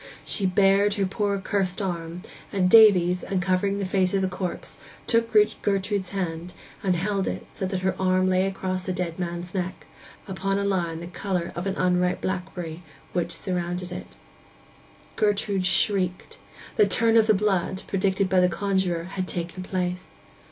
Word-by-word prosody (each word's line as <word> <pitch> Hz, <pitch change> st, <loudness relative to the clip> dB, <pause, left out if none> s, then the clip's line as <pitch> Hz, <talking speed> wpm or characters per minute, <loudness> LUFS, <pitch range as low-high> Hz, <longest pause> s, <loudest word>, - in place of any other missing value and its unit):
She 195 Hz, -, -1 dB
bared 200 Hz, +2 st, +3 dB
her 200 Hz, -2 st, +1 dB
poor 200 Hz, +1 st, -1 dB
curst 195 Hz, -1 st, -1 dB
arm; 175 Hz, -2 st, -4 dB, 0.3 s
and 185 Hz, -3 st, +1 dB
Davies, 180 Hz, -5 st, +7 dB
uncovering 190 Hz, +1 st, 0 dB
the 200 Hz, -, -2 dB
face 185 Hz, 0 st, +1 dB
of 195 Hz, -, +1 dB
the -, -, +2 dB
corpse, 180 Hz, -1 st, -5 dB, 0.3 s
took 230 Hz, -1 st, +1 dB, 0.3 s
Gertrude's 195 Hz, -1 st, 0 dB
hand, 175 Hz, -2 st, -4 dB, 0.3 s
and 185 Hz, -2 st, +1 dB
held 195 Hz, +2 st, -1 dB
it -, -, -4 dB
so 190 Hz, -, -3 dB
that 185 Hz, -1 st, -3 dB
her 190 Hz, 0 st, +1 dB
arm 185 Hz, 0 st, +3 dB
lay 185 Hz, +1 st, +2 dB
across 185 Hz, -1 st, -3 dB
the 185 Hz, 0 st, -3 dB
dead 180 Hz, -1 st, -3 dB
man's 175 Hz, 0 st, -4 dB
neck, 185 Hz, -1 st, -4 dB, 0.4 s
upon 195 Hz, 0 st, -1 dB
a 200 Hz, -, 0 dB
line 175 Hz, -4 st, -1 dB
the -, -, -6 dB
colour 180 Hz, -1 st, -3 dB
of 175 Hz, +3 st, -3 dB
an 195 Hz, -, -1 dB
unripe 180 Hz, 0 st, +2 dB
blackberry, 180 Hz, -3 st, -4 dB, 0.3 s
which 175 Hz, -1 st, -1 dB
surrounded 180 Hz, 0 st, -3 dB
it. -, -, -8 dB, 1.0 s
Gertrude 205 Hz, -3 st, +1 dB
shrieked: 185 Hz, -1 st, 0 dB, 0.4 s
'the 210 Hz, -, +5 dB
turn 225 Hz, +4 st, +3 dB
o' 225 Hz, -, +8 dB
the 215 Hz, -1 st, +3 dB
blood,' 190 Hz, -2 st, 0 dB
predicted 195 Hz, 0 st, +1 dB
by 185 Hz, 0 st, +3 dB
the 180 Hz, 0 st, +4 dB
conjuror, 190 Hz, -3 st, 0 dB
had 185 Hz, +1 st, -4 dB
taken 175 Hz, +2 st, -4 dB
place. 180 Hz, -1 st, -4 dB
185 Hz, 165 wpm, -25 LUFS, 180-195 Hz, 1.0 s, o